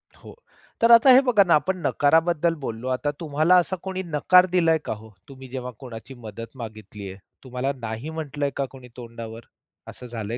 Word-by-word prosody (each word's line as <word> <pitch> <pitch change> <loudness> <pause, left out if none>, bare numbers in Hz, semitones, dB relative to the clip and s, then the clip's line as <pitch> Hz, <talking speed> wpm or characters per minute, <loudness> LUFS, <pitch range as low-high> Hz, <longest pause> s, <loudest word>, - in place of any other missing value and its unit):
हो - - -14 0.5
तर 230 +1 +5
आता 235 +3 +8
हे 260 - +8
बघा 230 -6 +5
ना, 175 -3 +2
आपण 170 +6 0
नकाराबद्दल 165 +2 +2
बोललो 115 +2 -5
आता 130 +3 -1
तुम्हाला 155 +2 +2
असा 190 - -4
कोणी 190 -1 -4
नकार 175 +3 +4
दिलाय 165 -2 +4
का - - -2
ओ? 110 +1 -14 0.2
तुम्ही 135 -1 -11
जेव्हा 125 0 -6
कोणाची 125 0 -10
मदत 115 +5 -9
मागितली 105 -3 -9
आहे 95 +1 -11 0.2
तुम्हाला 130 +1 -3
नाही 115 +5 -5
म्हटलंय 145 -3 -3
का 140 - 0
कोणी 130 -2 -13
तोंडावर? 115 -1 -9 0.4
असं 125 - -10
झालंय 115 -1 -5
135 Hz, 180 wpm, -24 LUFS, 115-165 Hz, 0.5 s, आता